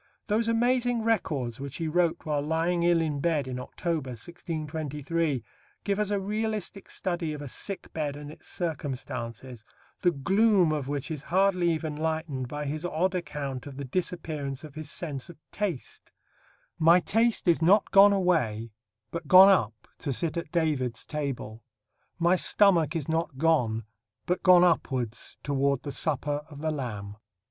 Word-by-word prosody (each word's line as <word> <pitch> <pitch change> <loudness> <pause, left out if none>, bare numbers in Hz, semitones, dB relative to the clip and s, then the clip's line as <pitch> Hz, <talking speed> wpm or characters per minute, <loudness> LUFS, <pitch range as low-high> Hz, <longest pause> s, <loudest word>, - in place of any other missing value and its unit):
Those 225 +1 +1
amazing 240 0 +2
records 145 - 0
which 140 0 -6
he 165 - -2
wrote 170 +1 +1
while 150 -2 0
lying 165 +3 0
ill 170 -1 +4
in 150 -3 -1
bed 150 -3 0
in 125 -1 -4
October, 155 +2 -3
1623, 155 - -3 0.4
give 200 0 0
us 210 -1 +1
a 205 -1 +1
realistic 210 -1 -3
study 175 -4 -2
of 150 - -7
a - - -6
sick 195 +9 -5
bed 150 -3 -2
and 145 0 -8
its - - -13
circumstances, 130 - -5 0.4
the 175 - +4
gloom 190 +3 +3
of 150 -4 -2
which 145 +2 -3
is 150 -3 -4
hardly 185 0 +2
even 160 -2 -2
lightened 155 -4 -2
by 145 +3 -4
his 150 +3 -3
odd 175 +2 0
account 145 -7 -4
of 135 -2 -9
the 140 - -5
disappearance 150 -3 -3
of 150 -3 -10
his 155 -1 -6
sense 145 -4 -4
of 175 - -11
taste: 190 -11 -4 0.7
"My 170 +3 +6
taste 225 +6 +1
is 170 -1 +4
not 195 +6 +4
gone 200 +1 +8
away, 150 - +1 0.4
but 165 -2 -5
gone 185 +3 +9
up 120 - +1
to 145 - -3
sit 160 +5 -2
at 170 -3 -4
David's 145 -9 0
table; 135 -7 -4 0.6
my 170 +1 +4
stomach 175 -5 +3
is 155 -4 -2
not 160 -3 -1
gone, 125 -8 +2 0.4
but 180 - 0
gone 180 -1 +7
upwards 130 -9 0
toward 140 -1 +1
the 145 - -4
Supper 145 0 -1
of 145 - -11
the 155 0 0
Lamb." 105 -8 -5
160 Hz, 160 wpm, -28 LUFS, 140-180 Hz, 0.7 s, gone